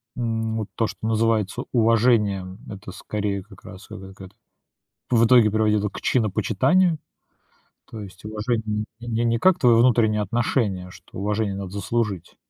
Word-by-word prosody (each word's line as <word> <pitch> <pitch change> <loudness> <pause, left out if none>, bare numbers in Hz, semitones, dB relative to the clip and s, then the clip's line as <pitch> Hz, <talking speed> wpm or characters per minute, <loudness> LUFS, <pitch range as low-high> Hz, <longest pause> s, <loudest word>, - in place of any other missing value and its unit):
М, 115 -2 -2
вот 110 - -4
то, 115 - +1
что 105 +2 -6
называется 110 -2 0
уважением, 110 -5 +2
это, 100 -2 -8
скорее, 100 0 -3
как 105 - -17
раз 95 0 -11
это 95 0 -9
какая-то, 95 +1 -13 0.7
в 115 -1 +4
итоге 115 -3 +6
приводило 105 -1 +1
к - - -9
чинопочитанию. 130 - +2 0.9
То 110 -2 -7
есть 95 0 -12
уважение 110 -1 -2 0.2
не 120 - -8
не 115 +1 0
не 115 0 +1
как 185 +5 +4
твое 120 -3 +5
внутреннее 115 -3 +3
отношение, 105 -3 -1
что - - -13
уважение 105 0 -1
надо 95 -2 -6
заслужить, 100 -3 -3
110 Hz, 150 wpm, -23 LUFS, 100-115 Hz, 0.9 s, итоге